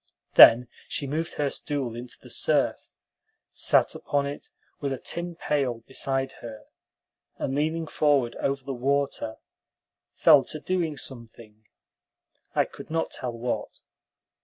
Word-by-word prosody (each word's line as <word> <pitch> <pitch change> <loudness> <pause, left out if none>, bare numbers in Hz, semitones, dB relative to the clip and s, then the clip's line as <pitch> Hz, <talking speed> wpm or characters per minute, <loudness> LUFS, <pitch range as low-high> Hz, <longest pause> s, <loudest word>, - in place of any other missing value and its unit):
Then 120 +2 +9 0.2
she 140 - -1
moved 160 +4 -3
her 145 -2 0
stool 135 -6 -3
into 120 +1 -8
the - - -12
surf, - - 0 0.6
sat - - +3
upon 145 -1 -1
it 140 +1 -6 0.3
with 140 -1 -2
a - - -3
tin 170 +5 -5
pail 135 -8 -1
beside 135 0 -2
her, 110 -2 -9 0.7
and, 135 - -2
leaning 160 +3 0
forward 145 -6 +1
over 135 0 -1
the 135 +1 -4
water, 135 -3 -1 0.8
fell - - +6
to 155 - -5
doing 165 -3 -1
something, 115 -4 -10 0.9
I - - +3
could - - -12
not 165 +1 -1
tell 125 -2 -4
what. 120 +1 -4
135 Hz, 135 wpm, -26 LUFS, 120-150 Hz, 0.9 s, Then